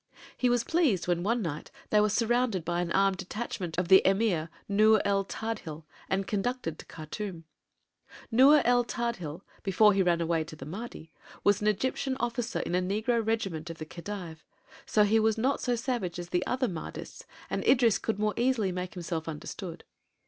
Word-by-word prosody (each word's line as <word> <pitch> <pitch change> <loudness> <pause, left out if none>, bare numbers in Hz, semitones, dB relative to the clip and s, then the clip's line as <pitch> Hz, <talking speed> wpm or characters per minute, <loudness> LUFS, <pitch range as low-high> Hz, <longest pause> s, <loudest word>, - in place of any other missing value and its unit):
He 250 - +1
was 245 -1 +2
pleased 285 - +1
when 175 -1 +1
one 225 +4 0
night 155 -3 -5 0.2
they 210 - +5
were 210 - +3
surrounded 230 -4 +1
by 175 0 0
an 175 -1 -3
armed 195 0 +3
detachment 190 -3 -5
of 180 -1 0
the 190 +1 +8
Emir 190 -5 +2 0.2
Nur 215 +2 +5
el 200 -1 +2
Tadhil 195 -7 -5 0.3
and 195 +1 0
conducted 205 -5 -2
to - - -11
Khartûm. 165 +2 -6 0.9
Nur 275 +6 +7
el 245 0 +4
Tadhil, 200 - -4 0.2
before 210 +2 +4
he 195 - +2
ran 175 -2 +2
away 165 -1 +1
to 155 0 -10
the 135 - -9
Mahdi, 170 -1 -8 0.3
was 205 0 +3
an 210 - 0
Egyptian 260 +5 0
officer 240 +1 -2
in - - -4
a 180 - +2
negro 220 +5 0
regiment 195 -8 -2
of 165 - -7
the 155 - -6
Khedive: 170 -1 -7 0.4
so 210 - +4
he 215 +2 +3
was 220 0 +2
not 260 +5 +1
so 245 -2 +1
savage 230 -8 -2
as 175 0 -6
the 180 +1 +1
other 255 0 0
Mahdists 170 -6 -7 0.3
and - - -1
Idris 235 -5 +4
could 220 - -2
more 210 0 0
easily 235 -6 +1
make 180 +1 -5
himself 165 -2 -4
understood. 165 +2 -7
200 Hz, 185 wpm, -29 LUFS, 175-230 Hz, 0.9 s, the